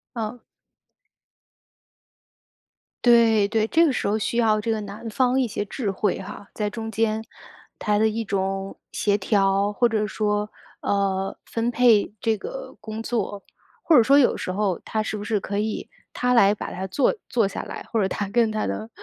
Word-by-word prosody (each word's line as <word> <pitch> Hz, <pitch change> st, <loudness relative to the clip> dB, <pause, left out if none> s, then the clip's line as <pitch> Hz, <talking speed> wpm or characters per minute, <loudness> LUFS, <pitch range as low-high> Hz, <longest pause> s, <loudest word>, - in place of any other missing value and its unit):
哦。 230 Hz, +1 st, -4 dB, 2.6 s
对， 230 Hz, -4 st, +5 dB
对， 220 Hz, +1 st, +1 dB
这 330 Hz, +7 st, +4 dB
个 290 Hz, -, +2 dB
时 -, -, -1 dB
候 210 Hz, +2 st, +1 dB
需 220 Hz, +2 st, -2 dB
要 220 Hz, -2 st, +3 dB
这 225 Hz, +2 st, -1 dB
个 220 Hz, -1 st, -1 dB
男 205 Hz, +3 st, -8 dB
方 255 Hz, +3 st, +2 dB
一 255 Hz, -, +2 dB
些 205 Hz, -, -3 dB
智 210 Hz, 0 st, -3 dB
慧 195 Hz, 0 st, -1 dB
哈， 195 Hz, +1 st, -9 dB
在 210 Hz, -1 st, -2 dB
中 225 Hz, +1 st, -5 dB
间 220 Hz, 0 st, 0 dB, 0.6 s
他 210 Hz, -1 st, +1 dB
的 220 Hz, +1 st, +4 dB
一 225 Hz, +1 st, -3 dB
种 195 Hz, -1 st, -2 dB
协 205 Hz, -1 st, +1 dB
调， 195 Hz, 0 st, +2 dB
或 240 Hz, +4 st, +2 dB
者 215 Hz, -2 st, 0 dB
说 210 Hz, 0 st, -1 dB, 0.3 s
呃， 195 Hz, -1 st, 0 dB
分 230 Hz, +1 st, -1 dB
配 240 Hz, -4 st, +4 dB
这 225 Hz, +1 st, +1 dB
个 -, -, -8 dB
工 220 Hz, 0 st, -6 dB
作。 225 Hz, -4 st, -3 dB, 0.5 s
或 325 Hz, -, +7 dB
者 240 Hz, -, +7 dB
说 275 Hz, +5 st, +6 dB
有 260 Hz, -, +4 dB
时 -, -, -4 dB
候 195 Hz, -1 st, 0 dB
他 220 Hz, -, -2 dB
是 215 Hz, -, -3 dB
不 205 Hz, -, -5 dB
是 210 Hz, 0 st, 0 dB
可 200 Hz, +1 st, -4 dB
以， 215 Hz, +1 st, -2 dB, 0.2 s
他 250 Hz, 0 st, 0 dB
来 205 Hz, -4 st, +6 dB
把 210 Hz, -, -6 dB
它 185 Hz, +1 st, -4 dB
坐 265 Hz, -, +1 dB
坐 230 Hz, -5 st, +2 dB
下 -, -, -5 dB
来， -, -, -8 dB
或 225 Hz, -, +1 dB
者 190 Hz, -, +2 dB
他 205 Hz, +2 st, -2 dB
跟 225 Hz, +2 st, +2 dB
他 215 Hz, 0 st, -1 dB
的 220 Hz, -, -4 dB
215 Hz, 200 characters per minute, -24 LUFS, 200-230 Hz, 2.6 s, 或